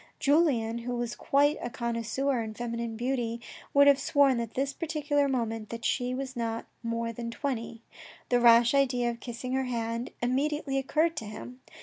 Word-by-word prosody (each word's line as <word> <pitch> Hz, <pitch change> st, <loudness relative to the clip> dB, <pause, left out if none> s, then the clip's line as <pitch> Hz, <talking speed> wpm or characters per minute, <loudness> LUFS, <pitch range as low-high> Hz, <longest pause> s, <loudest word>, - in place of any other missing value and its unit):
Julien, 270 Hz, -7 st, +2 dB
who 245 Hz, +1 st, -4 dB
was 240 Hz, -1 st, -2 dB
quite 290 Hz, +2 st, +2 dB
a 240 Hz, -, -3 dB
connoisseur 235 Hz, +2 st, -1 dB
in 220 Hz, -1 st, -6 dB
feminine 235 Hz, -1 st, -4 dB
beauty, 240 Hz, -1 st, -1 dB, 0.3 s
would 280 Hz, 0 st, +6 dB
have 280 Hz, -1 st, +6 dB
sworn 275 Hz, -3 st, +3 dB
at 230 Hz, -1 st, -5 dB
this 275 Hz, +2 st, -1 dB
particular 295 Hz, -3 st, 0 dB
moment 225 Hz, -4 st, -2 dB
that 230 Hz, 0 st, -6 dB
she 250 Hz, -1 st, 0 dB
was 265 Hz, 0 st, -5 dB
not 230 Hz, -1 st, -3 dB, 0.2 s
more 230 Hz, 0 st, -2 dB
than 235 Hz, +1 st, -5 dB
twenty. 230 Hz, -3 st, -4 dB, 0.5 s
The 245 Hz, -, +4 dB
rash 235 Hz, 0 st, +6 dB
idea 250 Hz, -3 st, +2 dB
of 235 Hz, -, -9 dB
kissing 245 Hz, +1 st, -5 dB
her 265 Hz, 0 st, +1 dB
hand 230 Hz, -1 st, -2 dB
immediately 275 Hz, +2 st, 0 dB
occurred 315 Hz, +5 st, +1 dB
to 225 Hz, -, -3 dB
him. 245 Hz, +4 st, -9 dB
245 Hz, 175 wpm, -29 LUFS, 230-275 Hz, 0.5 s, would